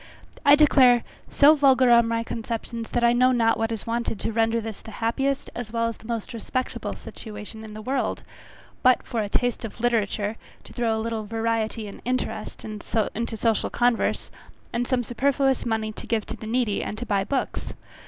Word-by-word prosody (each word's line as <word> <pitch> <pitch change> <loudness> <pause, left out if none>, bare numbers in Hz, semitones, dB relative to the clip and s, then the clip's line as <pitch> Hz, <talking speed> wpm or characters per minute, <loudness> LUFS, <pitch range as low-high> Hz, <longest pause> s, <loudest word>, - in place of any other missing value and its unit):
I 285 0 +8
declare, 260 -5 +6 0.3
so 295 +2 +6
vulgar 265 -4 +5
are 235 0 +8
my 230 0 -1
conceptions, 230 0 -5
that 240 - 0
I 235 0 +5
know 255 +1 +4
not 230 -2 +2
what 225 0 0
is 225 - -4
wanted 230 -2 -2
to - - -1
render 225 +1 +2
this 225 -2 -6
the - - -11
happiest 265 +6 -1
as 240 -3 -6
well 230 0 0
as 230 - -4
the 220 - -14
most 230 -2 -4
respectable 255 +2 -3
situation 215 0 -8
in 215 -1 -9
the 215 - -7
world, 265 +4 -1 0.6
but 255 -1 +5
a 215 -3 0
taste 245 +2 0
for 225 - -4
literature, 220 -2 0 0.3
to - - -14
throw 230 -2 0
a 220 - -2
little 225 -2 -3
variety 225 0 -1
and 200 - -10
interest 250 -3 -3
into 220 +1 -2
social 225 -1 +1
converse, 240 -1 +1 0.4
and 240 +1 -1
some 255 -2 +1
superfluous 270 +2 +1
money 220 -1 -1
to - - -10
give 225 -3 0
to - - -5
the 220 - -9
needy, 230 -3 0
and 210 - -4
to 245 - -4
buy 200 -4 +1
books. 265 +6 -2
230 Hz, 190 wpm, -25 LUFS, 220-245 Hz, 0.6 s, I